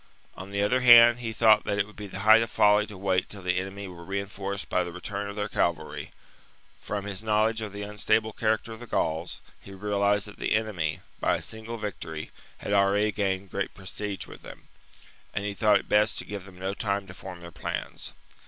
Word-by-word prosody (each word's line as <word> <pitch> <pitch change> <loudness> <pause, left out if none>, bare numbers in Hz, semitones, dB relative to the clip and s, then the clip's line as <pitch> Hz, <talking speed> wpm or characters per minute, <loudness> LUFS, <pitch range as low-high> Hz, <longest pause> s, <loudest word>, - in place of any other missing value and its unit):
On 95 +1 -8
the 100 0 0
other 125 +5 +2
hand, 120 -1 +9
he 115 -2 -3
thought 110 -1 +5
that 100 - -1
it 100 - +2
would 105 - -16
be 105 -1 -7
the 95 0 -6
height 110 +2 +7
of 115 - -1
folly 105 -1 +4
to 105 - -9
wait 95 -1 0
till 100 -3 -9
the 90 0 +1
enemy 95 +1 -6
were 85 -2 -10
reinforced 100 +1 -4
by 90 - +1
the 90 - -6
return 100 +3 -4
of 100 - -7
their 105 -1 -2
cavalry: 80 -6 -1 0.7
from 100 -1 -4
his 100 -1 -4
knowledge 110 +1 +2
of 105 -2 -4
the 100 +1 -6
unstable 110 +1 +1
character 110 +1 0
of 110 - -8
the 120 - -9
Gauls, 80 -2 -1 0.2
he 100 - -12
realized 100 +1 +1
that 105 - -11
the - - +1
enemy, 95 -9 -1 0.2
by - - +2
a - - -4
single 110 +1 -5
victory, 80 -7 -5 0.3
had 100 - -3
already 100 +2 +3
gained 95 -2 -2
great 100 0 -3
prestige 100 +1 -5
with - - -12
them; - - -11 0.7
and 100 - -1
he 105 - -2
thought 105 0 +4
it - - -6
best 105 0 +3
to - - -5
give 100 -2 -6
them 95 -2 -14
no 95 +1 -3
time 100 -1 -1
to 90 - -10
form 90 -1 -9
their 85 0 -9
plans. - - -5
100 Hz, 220 wpm, -27 LUFS, 95-105 Hz, 0.7 s, hand